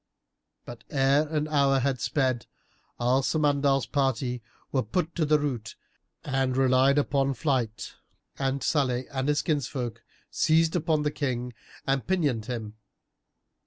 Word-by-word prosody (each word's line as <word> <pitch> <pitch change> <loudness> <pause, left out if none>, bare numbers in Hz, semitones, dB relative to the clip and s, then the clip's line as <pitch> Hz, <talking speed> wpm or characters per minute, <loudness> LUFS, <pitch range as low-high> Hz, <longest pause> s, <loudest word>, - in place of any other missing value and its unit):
But 120 0 -10
ere 140 +2 +3
an 155 0 -1
hour 140 -3 +3
had 130 -2 0
sped 130 -4 0 0.5
Al 125 +2 +3
Samandal's 140 -2 +2
party 130 -3 -1 0.3
were 130 - +2
put 165 - -2
to 160 - 0
the 150 0 +4
rout 130 -7 -3 0.5
and 135 -2 0
relied 135 +1 +4
upon 140 -1 +1
flight, 125 - -1 0.5
and 135 0 -1
Salih 130 -5 +1
and 130 -1 -2
his 150 0 +1
kinsfolk 125 -6 -2 0.3
seized 160 +1 +3
upon 160 -3 +1
the 150 - 0
King 125 -4 -3 0.3
and 135 -1 0
pinioned 145 -12 0
him. 110 -4 -5
135 Hz, 130 wpm, -27 LUFS, 125-150 Hz, 0.5 s, the